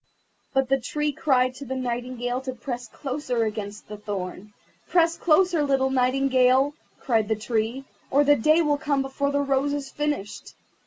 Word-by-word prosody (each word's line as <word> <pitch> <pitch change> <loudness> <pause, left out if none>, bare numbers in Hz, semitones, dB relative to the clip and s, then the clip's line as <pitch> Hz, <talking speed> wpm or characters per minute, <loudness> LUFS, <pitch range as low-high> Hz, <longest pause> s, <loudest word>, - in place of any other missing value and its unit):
But 270 -1 +1
the 270 0 +3
Tree 295 +4 -2
cried 255 -3 +2
to 270 +2 -9
the 265 +1 -4
Nightingale 245 0 -3
to 260 -1 -5
press 245 0 -5
closer 255 -1 -2
against 210 -1 -5
the 210 - -8
thorn. 205 -1 -6 0.4
"Press 335 -1 +3
closer, 350 0 +3
little 270 -2 +1
Nightingale," 260 +1 +3 0.3
cried 225 -5 +1
the 220 - +1
Tree, 225 +4 -2 0.2
"or 285 +2 +4
the 290 0 +5
Day 310 +7 +4
will 295 -2 +1
come 285 -3 0
before 270 +1 -2
the 285 0 +1
rose 275 +1 +1
is 285 -2 -4
finished." 295 -9 -4
265 Hz, 165 wpm, -25 LUFS, 240-285 Hz, 0.4 s, the